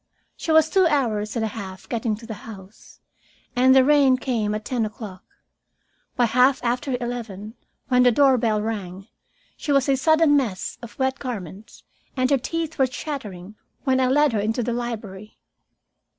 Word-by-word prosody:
She 325 - -3
was 315 0 +5
two 375 +1 +3
hours 225 -8 0
and 225 -2 0
a - - -2
half 190 -4 -8
getting 225 -2 -1
to 225 +2 -12
the 225 - -6 0.2
house, 195 -1 -13 0.5
and 260 +1 +5
the 265 - +7
rain 275 -2 +4
came 225 -5 -1
at 215 - -6
ten 245 -3 -1
o'clock. 210 -3 -7 0.9
By 245 - +3
half 250 +3 +3
after 250 +2 -1
eleven, 225 -4 -6 0.3
when 250 -2 +3
the 250 0 +5
doorbell 235 -5 +3
rang, 195 -2 -5 0.5
she 295 - -4
was 275 -1 +3
a 275 - +3
sodden 315 +2 +4
mass 230 -10 -2
of 235 -1 -11
wet 265 0 -1
garments, 210 - -7 0.3
and 255 +1 +1
her 275 - +4
teeth 325 +3 -4
were 265 - +4
chattering 215 - -7 0.3
when 260 -2 +2
I 260 - +3
led 290 0 +3
her 215 - +1
into 220 +4 -1
the 240 +1 -2
library. 215 -4 -6
240 Hz, 170 wpm, -23 LUFS, 215-265 Hz, 0.9 s, the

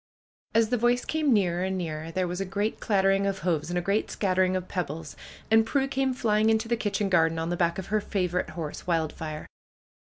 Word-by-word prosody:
As 225 -1 +4
the 245 -1 +1
voice 245 +1 +2
came 310 -3 +1
nearer 180 -5 +2
and 190 0 -1
nearer 160 -2 -4
there 180 +2 -1
was 180 +2 -3
a - - +1
great 200 +3 -2
clattering 195 -1 +2
of 195 -1 -2
hoofs 165 -3 0
and 175 - -1
a 175 - -1
great 200 +4 0
scattering 185 -2 +1
of 185 -1 -3
peb 180 -5 -2
bles, 155 +1 -7 0.4
and 225 0 +6
Prue 270 +4 0
came 270 -1 0
flying 215 -2 +2
into 220 +1 +2
the 235 - +1
kitchen 210 -2 -1
garden 165 -3 +3
on 165 +1 -2
the - - 0
back 170 -1 +1
of 190 - -4
her 215 - +3
favorite 180 -3 -1
horse, 155 0 -5
"Wildfire." 160 -2 -2
190 Hz, 220 wpm, -27 LUFS, 170-220 Hz, 0.4 s, and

